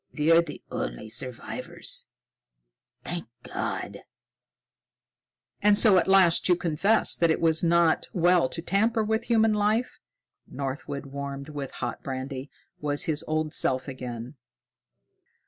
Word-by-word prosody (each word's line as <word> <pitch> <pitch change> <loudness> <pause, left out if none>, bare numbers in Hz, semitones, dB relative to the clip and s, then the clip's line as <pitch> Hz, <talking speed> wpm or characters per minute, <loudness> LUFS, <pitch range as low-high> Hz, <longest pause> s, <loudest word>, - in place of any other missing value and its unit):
We're 165 +3 +5
the 160 -4 -9
only - - -4
survivors 120 +2 -6 1.0
thank 175 0 -5 0.2
God!" - - -4 1.6
"And 205 0 +5
so 205 -4 +6
at - - -1
last 190 -3 +4
you 180 - +6
confess 175 +6 +2
that 170 - +2
it 160 - +2
is 160 0 +3
not 170 -1 +3
well 175 -5 +3
to 165 - -5
tamper 220 +5 +2
with 220 +1 -1
human 225 -2 +3
life?" 210 +4 0 0.5
Northwood, 140 +1 -5
warmed 140 +1 -6
with 145 -3 -5
hot - - -4
brandy, 130 +1 -5 0.3
was 145 -1 -1
his 155 -2 -1
old 155 0 -1
self 130 +1 +1
again. 125 0 -7
160 Hz, 125 wpm, -27 LUFS, 140-185 Hz, 1.6 s, so